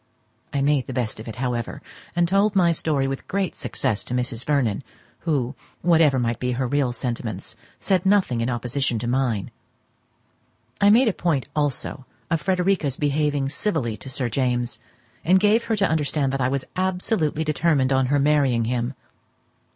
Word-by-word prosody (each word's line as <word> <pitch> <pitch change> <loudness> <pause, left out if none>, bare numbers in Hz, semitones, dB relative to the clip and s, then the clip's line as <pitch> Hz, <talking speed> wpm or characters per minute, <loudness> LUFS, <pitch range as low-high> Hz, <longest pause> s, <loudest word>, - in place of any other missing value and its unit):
I 140 -1 0
made 145 -2 +2
the 130 - -5
best 115 -4 -2
of 110 - -9
it, 115 - -6
however, 120 -1 -3 0.4
and 175 0 +3
told 200 +3 +2
my 175 -3 +4
story 150 -4 0
with 135 0 -5
great 195 -2 -1
success 115 -6 -2
to 125 - -3
Mrs. 125 -1 -2
Vernon, 135 -8 +1 0.4
who, 140 -6 -1 0.3
whatever 160 -5 +4
might 120 -2 0
be 125 0 -1
her 130 +2 -1
real 140 -1 +1
sentiments, 115 -4 -4 0.2
said 185 -3 +1
nothing 190 - +2
in 115 - 0
opposition 125 +1 -1
to 115 - -4
mine. 120 -5 0 1.3
I 200 - +6
made 235 +5 +6
a 215 - +2
point 155 -7 -1
also 145 -2 -2 0.2
of 165 -2 +1
Frederica's 180 -5 +1
behaving 145 -1 0
civilly 140 - -1
to 135 - -9
Sir 130 -1 -1
James, 120 -1 -1 0.4
and 185 +3 +5
gave 210 +3 +3
her 225 - +1
to 200 -2 +2
understand 150 -3 0
that 135 - -1
I 125 - +3
was 135 0 -2
absolutely 185 -4 0
determined 150 -3 +2
on 130 -1 +2
her 145 +2 +2
marrying 140 -5 +3
him. 120 +2 -1
140 Hz, 170 wpm, -23 LUFS, 125-165 Hz, 1.3 s, I